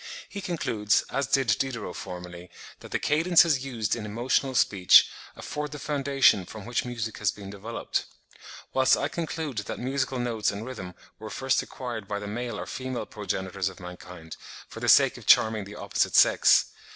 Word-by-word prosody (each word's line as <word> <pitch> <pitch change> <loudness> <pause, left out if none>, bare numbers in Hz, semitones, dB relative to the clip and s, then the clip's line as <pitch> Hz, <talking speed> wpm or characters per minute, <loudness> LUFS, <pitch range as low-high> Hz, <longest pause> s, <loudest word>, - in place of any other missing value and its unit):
He 200 - -7
concludes, 115 - 0
as 135 -2 -1
did 120 -7 +2
Diderot 120 -9 -3
formerly, 90 -1 -8 0.3
that - - -12
the - - 0
cadences 160 -2 +3
used 120 -6 -2
in 115 - -6
emotional 125 +5 -1
speech 95 -6 +6 0.3
afford 150 0 -5
the - - -6
foundation 140 -8 +2
from 105 +3 -10
which 120 0 -1
music 115 -3 -5
has 105 - +2
been 100 -1 -7
developed; 105 +4 -4 0.7
whilst 130 0 +4
I - - -1
conclude 160 -7 -4
that 105 - -5
musical 130 +1 -2
notes 120 -3 0
and 100 +2 -5
rhythm 95 -8 -7 0.2
were 110 0 -8
first 130 +2 0
acquired 120 -6 -7
by 100 - -3
the 105 - -6
male 120 +4 -4
or - - -5
female 130 -1 -5
progenitors 95 -2 -3
of 95 - -14
mankind 90 -2 -10 0.3
for - - -10
the - - -1
sake - - +6
of - - -16
charming 110 -2 +5
the 100 +1 -10
opposite - - -1
sex. - - +5
115 Hz, 175 wpm, -27 LUFS, 100-135 Hz, 0.7 s, speech